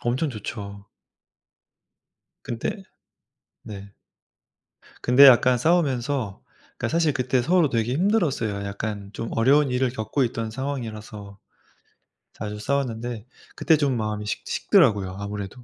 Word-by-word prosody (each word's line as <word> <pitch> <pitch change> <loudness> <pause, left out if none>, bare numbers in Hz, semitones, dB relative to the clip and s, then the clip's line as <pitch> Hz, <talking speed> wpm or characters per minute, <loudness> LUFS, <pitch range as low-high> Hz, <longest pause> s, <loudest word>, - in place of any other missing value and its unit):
엄청 130 +6 -1
좋죠. 100 -3 -7 1.6
근데 120 - -4 0.8
네. 100 -1 -10 1.1
근데 125 +3 +7
약간 125 -1 +6
싸우면서 135 - 0 0.3
그러니까 - - -2
사실 165 -2 +2
그때 125 -1 0
서로 170 +1 +3
되게 115 +1 0
힘들었어요. 145 - 0
약간 100 0 -5
좀 115 - -5
어려운 135 +4 +3
일을 125 0 +1
겪고 115 +3 -2
있던 115 -1 -3
상황이라서 110 -6 -6 1.0
자주 105 0 -6
싸웠는데 120 -3 -3 0.3
그때 160 -2 +3
좀 140 -4 0
마음이 105 -1 -3
식 105 - -4
식더라고요 105 - +2
아무래도. 100 +3 -6
120 Hz, 275 characters per minute, -24 LUFS, 105-140 Hz, 1.6 s, 근데